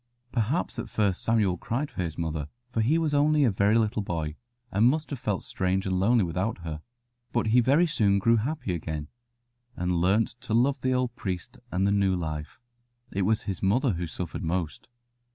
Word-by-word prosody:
Perhaps 120 +8 -1
at - - -5
first 100 -4 0
Samuel 105 -5 +2
cried 135 - -3
for - - -4
his 85 -3 -3
mother, 80 -3 -2 0.2
for 115 - 0
he 135 +9 +3
was 160 -3 0
only 150 +1 +4
a 120 - +4
very 100 +3 +3
little 110 -1 +1
boy, 80 -5 -3 0.4
and 105 +4 +4
must 155 +3 -1
have 140 - -3
felt 105 -5 -2
strange 95 +1 -1
and 95 -1 0
lonely 110 +3 +4
without 90 +6 -1
her; 80 -2 -5 0.5
but - - +1
he 120 +3 +5
very 140 +8 +4
soon 105 -11 +2
grew 115 +4 +4
happy 125 - -2
again, 80 -3 -4 0.7
and 90 -1 0
learnt 100 +5 +3
to 115 -4 -1
love 135 +4 +2
the 130 - +1
old 125 -2 -1
priest 95 -8 -5
and 95 +2 +1
the 100 - +3
new 100 -2 +2
life. 80 -2 -5 0.5
It 95 -1 0
was 110 0 +2
his 95 -4 -4
mother 115 +7 +2
who 85 0 -3
suffered 85 +3 -5
most. 85 - -3
100 Hz, 195 wpm, -27 LUFS, 90-120 Hz, 0.7 s, he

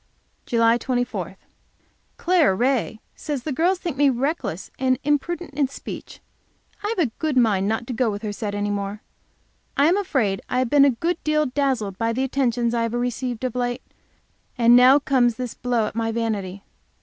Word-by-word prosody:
JULY 230 0 +3
24. 245 -1 -3 0.8
Clara 340 - +3
Ray 245 -1 0 0.2
says 290 -5 -4
the 310 - -3
girls 345 +7 +2
think 340 -6 -5
me 285 0 +4
reckless 255 - -2
and 260 -1 +2
imprudent 295 +3 -1
in 280 -1 +1
speech. 270 - -9 0.6
I've 420 +2 -2
a 305 -10 +1
good 310 -4 -1
mind 205 -5 +3
not 225 +2 -1
to 250 - -5
go 240 0 +1
with 205 +1 -5
her 210 - -2
set 205 -1 -4
any 205 0 -1
more. 200 +1 -4 0.7
I 280 - +5
am 345 +5 +4
afraid 255 - 0
I 250 - -1
have 255 -2 0
been 285 -1 +6
a - - +5
good 330 +8 -2
deal 305 0 +2
dazzled 255 -8 -1
by 230 0 0
the 260 +3 -1
attentions 245 -3 0
I 235 - +1
have 230 0 -1
received 245 0 -3
of 255 -3 -1
late; 245 0 -2 0.7
and 240 0 +6
now 255 +3 +7
comes 260 -5 +2
this 250 -1 -5
blow 245 -3 0
at - - -5
my 225 0 -1
vanity. 205 -4 -3
245 Hz, 185 wpm, -23 LUFS, 225-280 Hz, 0.8 s, now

